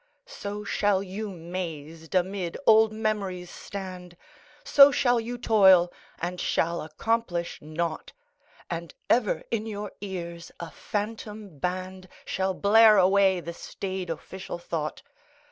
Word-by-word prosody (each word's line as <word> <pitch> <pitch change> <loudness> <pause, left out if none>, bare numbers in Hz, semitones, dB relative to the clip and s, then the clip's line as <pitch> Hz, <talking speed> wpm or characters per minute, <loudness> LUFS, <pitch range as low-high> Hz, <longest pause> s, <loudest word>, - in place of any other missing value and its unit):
So 210 - -6
shall 200 -1 +1
you 200 +3 -5
mazed 165 -3 -6
amid 185 -1 0
old 220 0 +6
memories 200 -5 -2
stand, 185 -3 -8 0.5
So 285 - +8
shall 245 -3 +3
you 240 +2 -4
toil, 190 -7 +5 0.2
and 175 +1 -4
shall 170 +1 0
accomplish 175 +2 -2
naught. 155 +1 -4 0.6
And 170 -2 -5 0.2
ever 230 -4 +2
in 225 -1 -1
your 210 -1 -5
ears 170 -4 -6
a 170 -2 -6
phantom 210 -3 -5
Band 185 +1 -4 0.2
Shall 190 0 -1
blare 215 +2 +6
away 190 -1 +4
the 170 0 -6
staid 185 +1 -5
official 185 +3 -6
thought. 160 -3 -4
190 Hz, 120 wpm, -27 LUFS, 170-210 Hz, 0.6 s, So